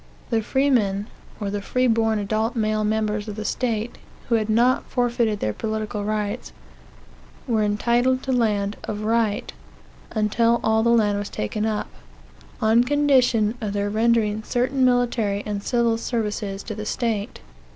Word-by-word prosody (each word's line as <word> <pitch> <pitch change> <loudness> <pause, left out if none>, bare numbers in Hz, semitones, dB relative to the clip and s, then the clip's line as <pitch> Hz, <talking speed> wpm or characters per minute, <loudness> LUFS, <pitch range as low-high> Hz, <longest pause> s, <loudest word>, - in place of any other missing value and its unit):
The 225 -1 +2
freemen, 220 -6 +1 0.3
or 200 -2 -3
the 205 0 -3
free 255 +5 0
born 225 -2 +2
adult 215 +3 -1
male 215 -1 0
members 215 0 -1
of 210 - -5
the 215 0 -5
state 230 0 -2 0.3
who - - +1
had 220 -1 +1
not 240 +4 +3
forfeited 235 -4 0
their 105 - 0
political 215 - -3
rights 210 -1 -3 1.0
were 225 -3 +1
entitled 240 +5 +1
to 265 - -2
land 210 -4 +1
of 210 0 -4
right, 220 -1 0 0.6
(until 230 +2 +2
all 220 0 +3
the 235 - +2
land 210 -3 +3
was 205 - -4
taken 210 - -2
up,) 215 -1 -2 0.7
on 225 +1 +4
condition 255 -6 +3
of 210 -2 -3
their 205 0 -1
rendering 220 -1 +2
certain 255 +4 0
military 240 -5 +1
and 205 -1 -3
civil 235 0 +1
services, 210 -4 -3
to 215 - -5
the 215 0 -6
state. 220 -4 -2
220 Hz, 150 wpm, -23 LUFS, 210-235 Hz, 1.0 s, on